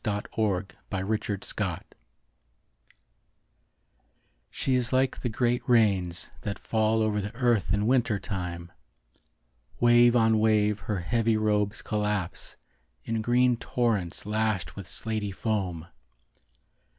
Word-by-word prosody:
A 105 -1 -1
Woman 100 -4 +1 0.3
in 95 -1 -2
Winter 105 -1 -1
Costume - - -3 2.7
She 135 - -1
is 125 -1 +1
like 130 0 +1
the 125 - -2
great 120 +2 0
rains 95 -7 +2
That 100 -1 -4
fall 110 0 +1
over 105 -1 0
the 105 +3 -6
earth 115 - +1
in 105 +2 +1
winter 120 -3 +2
time. 90 -4 -5 1.1
Wave 120 0 +6
on 110 -2 +4
wave 105 -1 +2
her 100 -4 -3
heavy 115 +4 +1
robes 105 -1 0
collapse 105 -4 -3 0.5
In 115 -1 -2
green 120 +1 +3
torrents 110 -9 -1
Lashed 105 -3 -1
with 100 -3 -8
slaty 110 +2 -3
foam. 95 -6 -2
110 Hz, 115 wpm, -27 LUFS, 100-115 Hz, 2.7 s, Wave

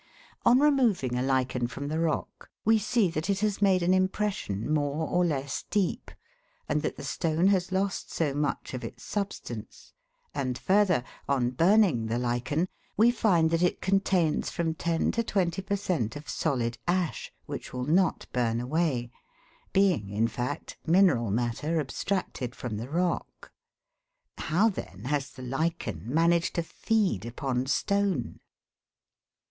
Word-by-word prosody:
On 250 - +7
removing 240 - +3
a 125 - 0
lichen 130 -2 +1
from 140 +4 -6
the 155 +2 -1
rock, 165 -2 -2 0.2
we 225 +1 +5
see 215 -3 +2
that 160 +4 -3
it 200 0 +1
has 210 -1 0
made 190 -3 +4
an 180 +2 +3
impression 185 - 0
more 150 +1 0
or 180 0 +2
less 140 -4 -1
deep, 200 -4 0 0.6
and - - +1
that - - -3
the - - -7
stone 165 +3 +1
has 190 -2 +1
lost 195 +1 -1
so 150 -4 0
much 145 -1 -2
of 125 - -5
its - - -8
substance; 195 - -5 0.4
and 130 -3 -2
further, 190 -8 +3 0.3
on 125 -3 +2
burning 165 - +4
the 115 +1 -1
lichen, 125 +7 0 0.3
we 230 +3 +6
find 175 -9 +3
that 165 0 +2
it 180 - +2
contains 190 -4 +1
from 165 -1 -1
ten 165 0 0
to 230 - 0
twenty 190 -4 0
per 200 +1 -1
cent, 170 - -1
of 145 0 -8
solid 120 -3 -1
ash, 175 -2 -1
which - - -6
will 125 0 -3
not 175 +5 +2
burn 115 -2 +1
away, 130 -2 0 0.6
being, 185 - +2
in 105 +3 +1
fact, 125 +3 -4
mineral 165 - +4
matter 120 +9 0
abstracted 140 -4 -3
from 115 -4 -4
the 115 +4 -6
rock. 175 +3 -2 0.9
How 185 +8 +2
then 95 - -5
has 145 0 -1
the 130 - -11
lichen 135 - -2
managed 170 +2 +2
to 170 - 0
feed 195 - 0
upon 125 +2 -2
stone 195 -2 0
160 Hz, 150 wpm, -28 LUFS, 125-190 Hz, 0.9 s, On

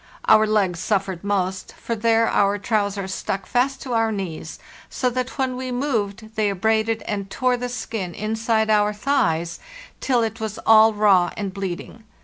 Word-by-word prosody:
Our 215 0 +6
legs 195 -5 +1
suffered 190 -2 -1
most; 190 -2 -2
for 230 - -4
there 225 +1 +2
our 200 0 +2
trousers 200 -2 -1
stuck 190 0 -3
fast 260 +4 0
to 255 - -4
our 225 -1 +2
knees, 180 -6 -5 0.3
so 250 -1 -1
that 255 +3 -3
when 260 -2 0
we 255 0 -4
moved 225 -5 -2
they 215 -1 +1
abraded 220 +3 0
and 200 -2 -4
tore 255 +4 +1
the 245 0 -4
skin 220 -7 -5
inside 220 +1 0
our 210 0 +3
thighs 170 - 0 0.4
till 245 -3 +1
it 225 0 -3
was 220 -2 -4
all 220 0 +7
raw 195 -4 +4
and 200 -2 -3
bleeding. 195 +3 -6
215 Hz, 165 wpm, -22 LUFS, 195-230 Hz, 0.4 s, all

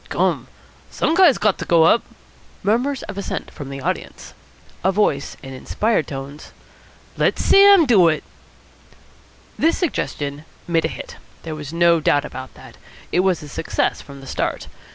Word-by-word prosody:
"Gum! - - 0 0.4
some 315 - 0
guy's 345 -6 +5
got 210 -2 +1
to - - -4
go 170 -2 +4
up." 220 +8 +5 0.6
Murmur 240 +8 +1
of 200 -1 -6
assent 200 - -5
from 145 -3 -9
the 135 0 -7
audience. 180 +6 -5 0.5
A 190 - +3
voice, 185 -8 0
in 135 0 -8
inspired 210 - -1
tones: 140 +2 -8 0.6
"Let - - +2
Sam 395 -3 +6
do 205 -10 +5
it!" 155 -2 0 1.4
This 330 +2 +2
suggestion 145 - -3 0.2
made 165 -2 +1
a - - +2
hit. - - -9 0.3
There 160 - -5
was 150 -2 -7
no 170 0 +3
doubt 145 -2 +2
about 130 0 -9
that. - - -14 0.3
It - - +1
was 185 -3 +1
a - - -9
success 145 - -2
from 140 -1 -12
the - - -12
start. - - -3
170 Hz, 160 wpm, -20 LUFS, 145-215 Hz, 1.4 s, Sam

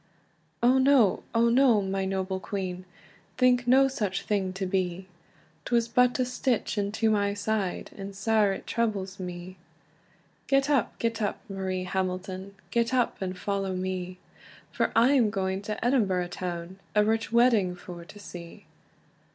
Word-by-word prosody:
"O 255 +2 +5
no, 260 -7 +4
O 230 +1 +4
no, 240 -2 +5
my 195 -1 -1
noble 190 0 -2
queen! 185 -2 -4 0.5
Think 250 -1 +3
no 265 +2 +6
such 205 -8 -2
thing 195 -3 0
to 190 0 -3
be! 185 -1 -1 0.6
'Twas 235 -1 +1
but 250 +1 +3
a 255 - +1
stitch 250 -2 -1
into 210 +2 0
my 200 -1 +1
side, 205 -2 -2
And 195 0 -7
sair 215 0 +2
it 195 - -5
troubles 200 -4 -2
me." 180 0 -7 0.9
"Get 275 +1 +2
up, 275 -6 +1
get 230 -1 -1
up, 205 - -1
Marie 190 -2 -3
Hamilton, 185 +1 -3 0.2
Get 235 +1 +1
up, 245 -5 0
and 185 -1 -3
follow 195 -1 -2
me, 185 0 -4 0.5
For - - 0
I 235 +4 +5
am 240 -6 +4
going 190 -2 -2
to 215 +2 -4
Edinburgh 195 -9 +2
town, 175 0 -5 0.2
A 210 0 +5
rich 225 0 0
wedding 230 -6 +4
for 175 -1 -9
to 190 - -14
see." 175 -4 -10
200 Hz, 150 wpm, -27 LUFS, 185-235 Hz, 0.9 s, no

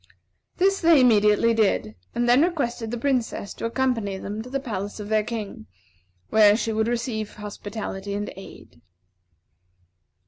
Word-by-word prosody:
This 390 +1 +2
they 330 -3 +6
immediately 225 -2 +4
did, 210 - +1 0.2
and 240 0 +1
then 245 +3 +5
requested 255 -9 -1
the 240 - -3
Princess 245 -5 -1
to - - -6
accompany 230 -5 -1
them 205 +3 -5
to 245 - -9
the 275 +1 -2
palace 205 -5 -5
of 205 0 -7
their 215 -1 +2
King, 210 - -6 0.6
where 210 -1 +6
she 225 -1 -2
would 220 +1 0
receive 230 -3 -3
hospitality 205 -1 -6
and 205 0 -4
aid. 90 - -13
220 Hz, 145 wpm, -24 LUFS, 205-240 Hz, 0.6 s, they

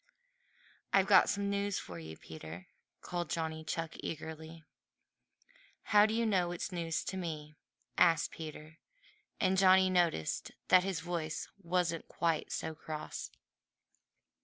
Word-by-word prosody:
"I've 195 -1 +5
got 190 -2 +6
some 200 0 0
news 200 0 0
for 85 -2 -7
you, 80 0 -9
Peter," 80 +2 -9 0.4
called 175 -3 -3
Johnny 160 0 -2
Chuck 165 0 -3
eagerly. 160 +1 -6 1.3
"How 210 0 +8
do 220 - -1
you 230 0 +2
know 185 -5 +2
it's 175 +2 -4
news 165 -2 -2
to 190 - -4
me?" 155 -4 -5 0.4
asked 165 -2 +4
Peter, 155 0 -9 0.6
and 190 -1 +3
Johnny 190 0 +6
noticed 170 - +1 0.2
that 185 0 +7
his 190 -5 -2
voice 165 -2 -3
wasn't 175 -2 0
quite 165 -2 -1
so 160 - -3
cross. 155 0 -6
170 Hz, 130 wpm, -33 LUFS, 155-185 Hz, 1.3 s, How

